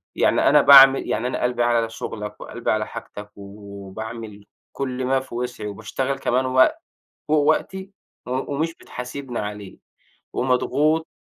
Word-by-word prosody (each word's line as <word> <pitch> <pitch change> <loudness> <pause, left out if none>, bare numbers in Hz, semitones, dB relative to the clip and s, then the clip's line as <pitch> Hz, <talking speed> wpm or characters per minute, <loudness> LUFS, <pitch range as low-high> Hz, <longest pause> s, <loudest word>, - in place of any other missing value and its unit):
يعني - - +3
أنا 145 0 +6
باعمل 135 -1 +8
يعني 120 - -1
أنا 125 - -3
قلبي 125 -1 +1
على 120 -1 +1
شُغلك 105 -2 -7
وقلبي - - -3
على - - -1
حاجتك 105 0 -9
وباعمل 100 +2 -9 0.3
كل 130 -2 -3
ما 135 +1 +2
في 130 -2 -10
وسْعِي 125 -3 -4
وباشتغل 130 +6 -3
كمان 130 0 0
وقت 130 - +3 0.5
فوق 155 +1 +3
وقتي 190 +6 0 0.4
و 125 - -7 0.2
ومش 165 +3 -2
بتحاسِبني 125 -2 -7
عليه 105 -2 -6 0.5
ومضغوط. 150 +5 +1
125 Hz, 140 wpm, -22 LUFS, 105-135 Hz, 0.5 s, باعمل